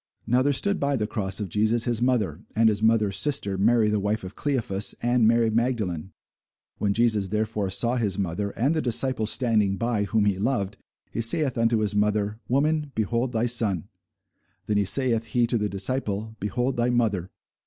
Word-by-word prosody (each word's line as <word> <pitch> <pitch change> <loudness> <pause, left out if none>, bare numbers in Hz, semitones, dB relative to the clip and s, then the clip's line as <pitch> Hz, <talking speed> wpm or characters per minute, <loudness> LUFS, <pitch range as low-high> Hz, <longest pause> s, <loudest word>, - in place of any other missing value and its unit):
Now 125 +3 +2
there 145 +2 +2
stood 200 +8 +1
by 140 0 0
the 110 -5 -1
cross 95 -3 -2
of 105 - -3
Jesus 110 +5 +1
his 120 -1 0
mother, 105 - 0
and 110 0 +4
his 105 -1 -1
mother's 110 -3 +2
sister, 100 -5 0
Mary 110 +3 +3
the 105 0 +1
wife 105 +1 -2
of 95 - -8
Cleophas, 110 -8 0
and 120 -2 +3
Mary 115 0 +3
Magdalene. 105 -7 -2 0.7
When 105 - 0
Jesus 110 -4 +1
therefore 105 0 -2
saw 120 +6 +1
his 105 -5 -1
mother, 100 +1 -2
and 135 +7 +1
the 155 - 0
disciple 125 -2 +1
standing 110 -5 +1
by, 115 -2 -1
whom 110 0 +1
he 100 -2 0
loved, 105 -3 -1 0.3
he 115 - -3
saith 130 +3 +2
unto 115 -1 +1
his 105 -2 0
mother, 105 +1 0
Woman, 150 +3 0
behold 115 +3 -1
thy 115 0 0
son! 110 -8 +1 0.8
Then 105 -1 +1
saith 115 +1 +3
he 120 +2 +1
to 120 +1 0
the 105 0 -1
disciple, 105 +1 -3
Behold 120 +6 -2
thy 120 +1 +1
mother! 105 -7 0
110 Hz, 185 wpm, -25 LUFS, 105-120 Hz, 0.8 s, and